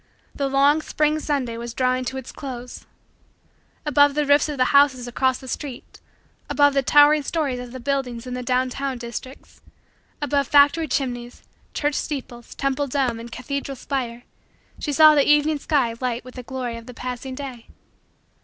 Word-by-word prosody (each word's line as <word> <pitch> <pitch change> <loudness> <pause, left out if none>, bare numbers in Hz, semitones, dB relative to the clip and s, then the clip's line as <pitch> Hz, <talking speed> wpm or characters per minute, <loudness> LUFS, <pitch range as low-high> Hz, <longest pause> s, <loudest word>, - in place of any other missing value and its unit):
The 280 - -1
long, 280 +3 +4
spring, 305 0 0
Sunday 270 -7 -2
was 235 0 -7
drawing 255 0 +1
to 265 +2 -4
its 265 - -7
close. 250 -3 -8 1.0
Above 285 -1 +4
the 300 0 +1
roofs 285 +1 +4
of 295 - -4
the 255 - +2
houses 275 -3 +4
across 260 +1 +1
the 260 - -12
street, 265 -1 -7 0.5
above 285 -1 +4
the 275 - +2
towering 295 +3 +6
stories 280 -3 -2
of 245 -1 -8
the 260 - -7
buildings 255 -2 -2
in 250 - -6
the 250 - -3
down 255 +1 0
town 275 0 -3
districts, 240 +2 -9 0.6
above 285 -2 0
factory 290 +3 +4
chimneys, 245 -4 -3 0.3
church 295 0 0
steeples, 250 -5 -5
temple 275 +1 -1
dome, 255 -4 -1
and 235 0 -9
cathedral 275 +2 -4
spire, 245 -3 -4 0.6
she 295 - -2
saw 310 +1 +7
the 290 -2 +4
evening 295 0 +3
sky 275 -6 +1
light 245 -1 -2
with 255 - -11
the 250 - -7
glory 245 -2 -5
of 230 +1 -12
the 250 - -10
passing 255 +1 -5
day. 255 -4 -8
265 Hz, 175 wpm, -23 LUFS, 250-285 Hz, 1.0 s, saw